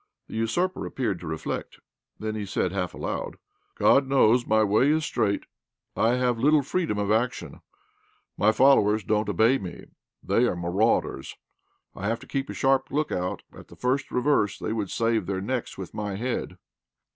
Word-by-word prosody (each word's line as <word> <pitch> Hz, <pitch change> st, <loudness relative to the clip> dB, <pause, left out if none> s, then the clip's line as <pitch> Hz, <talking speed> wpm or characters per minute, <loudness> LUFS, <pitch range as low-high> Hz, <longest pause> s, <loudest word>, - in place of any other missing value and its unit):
The -, -, -12 dB
usurper 120 Hz, +12 st, -1 dB
appeared 110 Hz, -9 st, -2 dB
to 85 Hz, -, -8 dB
reflect. 80 Hz, 0 st, -5 dB, 0.4 s
Then 110 Hz, 0 st, -4 dB
he 110 Hz, -1 st, -3 dB
said, 95 Hz, -2 st, -1 dB
half 90 Hz, -2 st, -3 dB
aloud -, -, -4 dB, 0.4 s
"God 135 Hz, -1 st, +4 dB
knows 125 Hz, -3 st, +4 dB
my 110 Hz, 0 st, +4 dB
way 110 Hz, +7 st, +3 dB
is 155 Hz, +1 st, +2 dB
straight. 100 Hz, -7 st, 0 dB, 0.5 s
I 115 Hz, +2 st, +2 dB
have 125 Hz, -2 st, 0 dB
little 150 Hz, +3 st, +4 dB
freedom 165 Hz, -, -1 dB
of 100 Hz, 0 st, 0 dB
action. 120 Hz, +3 st, -1 dB, 0.7 s
My 110 Hz, -, +3 dB
fellows 110 Hz, -4 st, +4 dB
don't 105 Hz, +2 st, 0 dB
obey 120 Hz, +5 st, +3 dB
me 90 Hz, -2 st, -8 dB, 0.4 s
they 120 Hz, -, +2 dB
are -, -, -1 dB
marauders. 90 Hz, +6 st, 0 dB, 0.6 s
I 100 Hz, -, -4 dB
have 115 Hz, +2 st, -1 dB
to -, -, -11 dB
keep 135 Hz, 0 st, -3 dB
a -, -, -5 dB
sharp 135 Hz, 0 st, +2 dB
look 150 Hz, +2 st, -1 dB
out 90 Hz, 0 st, -3 dB
at -, -, -13 dB
the -, -, -14 dB
first 130 Hz, +2 st, -1 dB
reverse 125 Hz, -5 st, +1 dB
they -, -, -3 dB
would 105 Hz, -4 st, -2 dB
save 115 Hz, -5 st, 0 dB
their 95 Hz, -1 st, -1 dB
necks 120 Hz, +5 st, -3 dB
with 95 Hz, -2 st, -7 dB
my 105 Hz, -2 st, -3 dB
head." 120 Hz, +5 st, -3 dB
110 Hz, 175 wpm, -26 LUFS, 100-130 Hz, 0.7 s, God